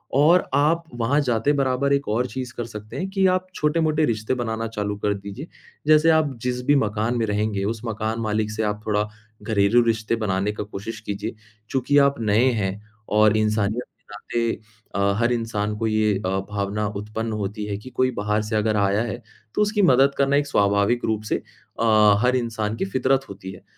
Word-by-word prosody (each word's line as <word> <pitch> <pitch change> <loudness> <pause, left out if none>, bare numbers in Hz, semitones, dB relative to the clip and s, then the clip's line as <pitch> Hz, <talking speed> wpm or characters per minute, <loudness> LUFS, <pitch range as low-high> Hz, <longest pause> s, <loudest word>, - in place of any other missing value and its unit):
और 160 +6 +5
आप 160 +4 +3
वहाँ 125 +5 +1
जाते 125 +2 +1
बराबर 140 0 +1
1 140 0 0
और 115 +4 +1
चीज़ 125 -1 -6
कर 120 - -3
सकते 105 -1 -9
हैं 185 - -2
कि 195 -1 +2
आप 185 0 +1
छोटे-मोटे 155 0 +1
रिश्ते 110 0 -1
बनाना 115 -2 -2
चालू 105 -2 -3
कर 105 0 0
दीजिए। 100 - -8 0.4
जैसे 155 +1 +6
आप 150 -3 +1
जिस 125 0 -1
भी 145 - +4
मकान 110 -1 0
में 115 - +1
रहेंगे, 105 -1 -1
उस 110 +1 -3
मकान 110 0 -2
मालिक 105 0 -1
से 110 +1 -2
आप 105 0 -2
थोड़ा 105 0 +1 0.4
घरेलू 110 +2 +3
रिश्ते 115 0 0
बनाने 105 -2 -1
का 105 - -4
कोशिश 105 +2 -7
कीजिए, 110 +2 -5 0.3
चूँकि 135 +2 +1
आप 140 -3 +3
नए 110 +4 +3
हैं 95 +2 -3 0.4
और 110 0 +5
इंसानियत 110 +2 0
के - - -41
नाते 115 +3 -2 0.4
अ, 100 0 +2
हर 120 +1 +2
इंसान 105 -3 -2
को 115 0 -1
ये 110 -1 +2
अ, - - 0 0.2
भावना 105 +1 -1
उत्पन्न 110 +2 -4
होती 105 0 -3
है 100 -1 -3
कि 105 +5 -11
कोई 130 0 +1
बाहर 105 +1 +1
से 110 +1 -3
अगर 110 0 +1
आया 100 +1 +2
है, 120 +1 -5 0.3
तो - - +2
उसकी 210 0 +2
मदद 135 -4 +4
करना 140 +1 +3
एक 145 0 0
स्वाभाविक 100 +1 +2
रूप 110 -1 -1
से - - +3 0.5
हर 110 +1 +4
अ, - - +4
इंसान 110 -3 -2
की - - -1
फ़ितरत 130 +5 0
होती 95 -1 -8
है। 95 - -13
110 Hz, 195 wpm, -23 LUFS, 105-130 Hz, 0.5 s, जैसे